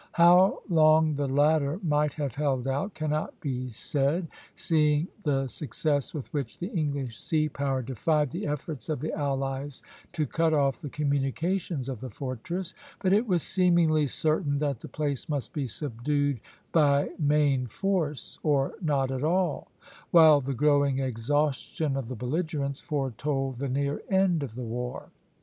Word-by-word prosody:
How 175 +3 +5
long 155 -3 +5
the 145 -1 -1
latter 145 +3 +2
might 150 -2 +1
have 145 -5 -3
held 135 -2 -1
out 140 +10 -2
cannot 155 0 -2
be 130 -2 -3
said, 145 +7 -1 0.3
seeing 150 0 +2
the 135 -6 +1
success 145 +2 -1
with 150 -7 -5
which 140 -6 -3
the 180 +5 -5
English 140 -7 -2
sea 155 -1 +1
power 135 -3 -1
defied 145 +4 0
the 180 +5 -4
efforts 150 -2 -5
of 155 - -1
the 155 - -3
allies 135 -1 -3 0.3
to 155 -3 0
cut 160 +3 +1
off 140 -2 +1
the 145 - -5
communications 145 +2 -1
of 130 -5 -4
the 130 - -5
fortress; 150 +9 -5 0.3
but 190 -1 +2
it 215 +4 +3
was 180 -5 +2
seemingly 170 -5 +3
certain 155 +1 0
that 140 -4 -1
the - - -9
place 145 0 -3
must 145 -3 -3
be 140 -4 -2
subdued 145 +2 -1 0.3
by 145 -3 +3
main 145 -4 +2
force 165 - -2
or 140 -3 +1
not 140 -5 +1
at 130 +1 -3
all, 175 +1 0 0.4
while 160 -4 +7
the 135 0 -3
growing 145 0 +3
exhaustion 135 +3 -1
of 135 -4 -3
the 130 - -5
belligerents 140 +2 -2
foretold 135 -2 -2
the 140 0 -2
near 140 +2 -1
end 190 -4 +3
of 125 -6 -5
the 125 0 -5
war. 125 +2 -5
145 Hz, 155 wpm, -27 LUFS, 135-155 Hz, 0.4 s, while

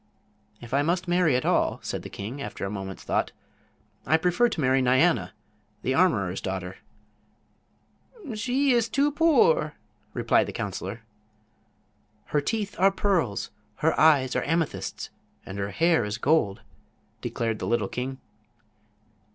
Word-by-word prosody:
"If 120 +1 -9
I 140 - +3
must 175 +4 0
marry 175 -5 +3
at 125 - 0
all," - - +1
said - - -4
the - - -9
king, 115 +8 -6
after - - -5
a 100 - -4
moment's 95 -2 -6
thought, - - 0 0.7
"I 160 - +3
prefer 180 +8 +2
to 175 - -5
marry 130 -1 +3
Nyana, 130 +7 +3 0.5
the 130 - 0
armorer's 110 - +2
daughter." 95 -1 -4 1.6
"She 255 +6 +1
is 235 -2 +2
too 285 +4 +2
poor," 335 - +3 0.4
replied - - +2
the - - -6
counselor. 100 0 -5 1.2
"Her 150 - 0
teeth 210 +5 -2
are 195 +2 +6
pearls, 180 - 0 0.2
her - - +1
eyes 140 -5 +4
are - - +2
amethysts, 165 +1 -2 0.3
and 95 +1 -7
her 100 0 -2
hair 165 +3 +2
is 105 +1 -3
gold," 125 -7 +1 0.6
declared 115 -2 -2
the - - -3
little 115 -4 +1
king. 130 +4 -4
145 Hz, 140 wpm, -26 LUFS, 110-185 Hz, 1.6 s, are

